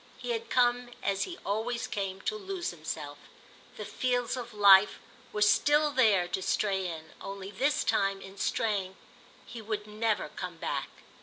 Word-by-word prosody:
He -, -, -4 dB
had 460 Hz, -1 st, -3 dB
come, 245 Hz, 0 st, +2 dB
as 195 Hz, -1 st, 0 dB
he 360 Hz, -1 st, -8 dB
always 225 Hz, +4 st, -1 dB
came, 195 Hz, -1 st, -4 dB
to 430 Hz, -, -2 dB
lose 390 Hz, -3 st, -4 dB
himself; 155 Hz, -3 st, -6 dB, 0.6 s
the 210 Hz, -, -5 dB
fields 245 Hz, +3 st, -1 dB
of 240 Hz, -2 st, -6 dB
light 200 Hz, -1 st, +7 dB, 0.4 s
were 210 Hz, -, +1 dB
still 295 Hz, +8 st, +4 dB
there 215 Hz, -9 st, +4 dB
to 190 Hz, -, -2 dB
stray 190 Hz, -1 st, 0 dB
in; 160 Hz, -2 st, -7 dB
only 195 Hz, 0 st, -7 dB
this 275 Hz, +6 st, +1 dB
time, 195 Hz, 0 st, +1 dB
in 195 Hz, 0 st, -12 dB
straying, 200 Hz, -4 st, -1 dB, 0.5 s
he 235 Hz, -, -8 dB
would 215 Hz, -1 st, -4 dB
never 215 Hz, +1 st, -1 dB
come -, -, -7 dB
back. -, -, -3 dB
210 Hz, 160 wpm, -30 LUFS, 195-245 Hz, 0.6 s, light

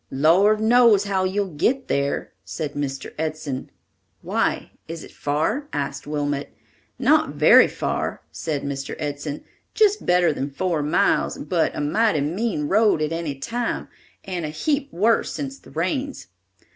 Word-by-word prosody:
"Lord 180 Hz, +10 st, +4 dB
knows 225 Hz, -2 st, +5 dB
how 195 Hz, -2 st, 0 dB
you'll 190 Hz, -1 st, -1 dB
get 255 Hz, -, 0 dB
there," 140 Hz, 0 st, -1 dB
said 150 Hz, -3 st, -5 dB
Mr. 135 Hz, -2 st, -4 dB
Edson. 155 Hz, -4 st, -3 dB, 0.5 s
"Why, -, -, -1 dB, 0.2 s
is 165 Hz, 0 st, -6 dB
it -, -, -12 dB
far?" 160 Hz, -, -1 dB
asked 140 Hz, -1 st, -3 dB
Wilmot. 145 Hz, -1 st, -2 dB, 0.5 s
"Not -, -, +3 dB
very -, -, +7 dB
far," -, -, -3 dB
said 150 Hz, -4 st, -3 dB
Mr. 135 Hz, -1 st, -4 dB
Edson, 145 Hz, 0 st, -4 dB, 0.4 s
"little 420 Hz, -1 st, +4 dB
better 175 Hz, -2 st, +4 dB
than 140 Hz, 0 st, -3 dB
four 165 Hz, +2 st, -1 dB
miles, 150 Hz, +1 st, +1 dB
but -, -, 0 dB
a -, -, -2 dB
mighty 160 Hz, +2 st, +2 dB
mean 165 Hz, 0 st, -1 dB
road 210 Hz, -2 st, +3 dB
at 155 Hz, 0 st, -1 dB
any 165 Hz, -4 st, -3 dB
time 230 Hz, -, -3 dB, 0.4 s
and 180 Hz, -3 st, -4 dB
a 155 Hz, -, -3 dB
heap 285 Hz, -, -1 dB
worse 220 Hz, +6 st, +2 dB
since 275 Hz, -1 st, -5 dB
the -, -, -17 dB
rains. 260 Hz, -, -3 dB
165 Hz, 145 wpm, -23 LUFS, 145-215 Hz, 0.5 s, very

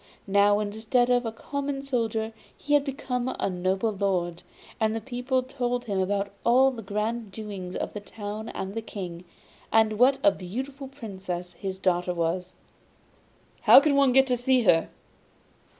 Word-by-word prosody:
Now, 200 Hz, +1 st, +4 dB
instead 220 Hz, +4 st, +1 dB
of 245 Hz, -1 st, +2 dB
a -, -, -2 dB
common 275 Hz, +4 st, -4 dB
soldier 225 Hz, -4 st, -1 dB, 0.2 s
he 290 Hz, -, -2 dB
had 290 Hz, -1 st, +5 dB
become 260 Hz, -2 st, -3 dB
a -, -, 0 dB
noble 190 Hz, +4 st, 0 dB
lord, 180 Hz, -4 st, -1 dB, 0.4 s
and 220 Hz, 0 st, +1 dB
the -, -, -1 dB
people 255 Hz, +1 st, -1 dB
told 245 Hz, -2 st, -2 dB
him 200 Hz, -4 st, -1 dB
about 200 Hz, +1 st, 0 dB
all 260 Hz, +3 st, +5 dB
the 240 Hz, -3 st, -7 dB
grand 210 Hz, +2 st, -3 dB
doings 195 Hz, -3 st, -6 dB
of -, -, -3 dB
the 210 Hz, -, -4 dB
town 210 Hz, +1 st, -7 dB
and 190 Hz, +1 st, -5 dB
the 225 Hz, -, -3 dB
King, 180 Hz, -5 st, -7 dB, 0.5 s
and 220 Hz, -1 st, +3 dB
what 265 Hz, +2 st, +5 dB
a 300 Hz, -, +7 dB
beautiful 265 Hz, +9 st, -6 dB
Princess 190 Hz, -9 st, -6 dB
his 190 Hz, +2 st, -5 dB
daughter 180 Hz, -1 st, 0 dB
was. 175 Hz, +2 st, -2 dB, 1.1 s
'How -, -, +9 dB
can 285 Hz, 0 st, +2 dB
one 275 Hz, -2 st, +5 dB
get 265 Hz, +1 st, +5 dB
to 250 Hz, -2 st, +1 dB
see 250 Hz, 0 st, +2 dB
her? 165 Hz, -5 st, +4 dB
220 Hz, 165 wpm, -26 LUFS, 195-255 Hz, 1.1 s, How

